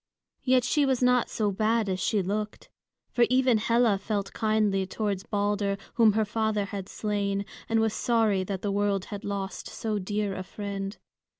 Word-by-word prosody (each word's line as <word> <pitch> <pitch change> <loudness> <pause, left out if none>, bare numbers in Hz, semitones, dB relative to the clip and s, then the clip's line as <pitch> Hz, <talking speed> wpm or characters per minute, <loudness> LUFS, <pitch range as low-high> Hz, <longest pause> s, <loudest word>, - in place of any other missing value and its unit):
Yet 255 -1 +3
she 290 +5 +2
was 265 -2 +1
not 250 -1 +3
so 210 -2 0
bad 220 +2 +1
as 185 -1 -1
she 200 +1 +1
looked; 210 +3 -3 0.4
for 240 - +4
even 255 -3 +4
Hela 230 -2 +3
felt 200 -1 -3
kindly 215 -4 +1
towards 200 -1 -2
Balder, 205 -1 0 0.2
whom 225 -3 +5
her 220 0 +2
father 220 -1 0
had 195 -1 -6
slain, 200 -1 -1 0.2
and 225 0 +3
was 220 -1 +1
sorry 220 -5 +2
that 190 -1 -4
the 205 - 0
world 200 -1 0
had 205 +1 -6
lost 195 -1 -4
so 215 -2 -2
dear 205 +1 -2
a 185 - -4
friend. 200 +1 -5
210 Hz, 175 wpm, -27 LUFS, 200-225 Hz, 0.4 s, whom